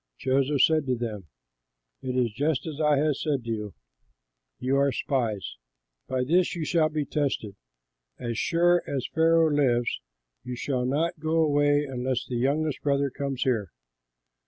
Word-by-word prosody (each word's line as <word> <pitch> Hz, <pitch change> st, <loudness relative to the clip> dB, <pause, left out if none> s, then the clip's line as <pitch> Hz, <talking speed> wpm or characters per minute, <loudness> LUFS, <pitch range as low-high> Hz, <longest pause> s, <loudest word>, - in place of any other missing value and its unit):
Joseph 135 Hz, +2 st, +2 dB
said 155 Hz, -3 st, +3 dB
to 130 Hz, -, +1 dB
them, 110 Hz, -6 st, -5 dB, 0.7 s
"It 130 Hz, -1 st, -3 dB
is 120 Hz, -4 st, +1 dB
just 145 Hz, +4 st, 0 dB
as 160 Hz, -2 st, -5 dB
I 150 Hz, -1 st, +3 dB
said 140 Hz, -2 st, -1 dB
to 115 Hz, -, -7 dB
you, 105 Hz, -2 st, -4 dB, 0.8 s
'You 135 Hz, +2 st, 0 dB
are 140 Hz, 0 st, +3 dB
spies.' 110 Hz, -, -2 dB, 0.5 s
By 130 Hz, -1 st, 0 dB
this 175 Hz, +7 st, +2 dB
you 165 Hz, -3 st, -3 dB
shall 160 Hz, -1 st, +2 dB
be 155 Hz, -1 st, -2 dB
tested: 135 Hz, -8 st, -2 dB, 0.6 s
as 120 Hz, -2 st, -4 dB
sure 175 Hz, +7 st, +3 dB
as 135 Hz, -3 st, -2 dB
Pharaoh 165 Hz, 0 st, +4 dB
lives 125 Hz, -5 st, +1 dB, 0.4 s
you 125 Hz, -, -5 dB
shall 125 Hz, 0 st, -1 dB
not 160 Hz, +5 st, 0 dB
go 160 Hz, +1 st, -1 dB
away 145 Hz, -1 st, +3 dB
unless 130 Hz, -2 st, -2 dB
your 120 Hz, -, -1 dB
youngest 145 Hz, +4 st, 0 dB
brother 140 Hz, -1 st, +1 dB
comes 135 Hz, -1 st, -3 dB
here. 110 Hz, -8 st, 0 dB
140 Hz, 155 wpm, -26 LUFS, 125-155 Hz, 0.8 s, Pharaoh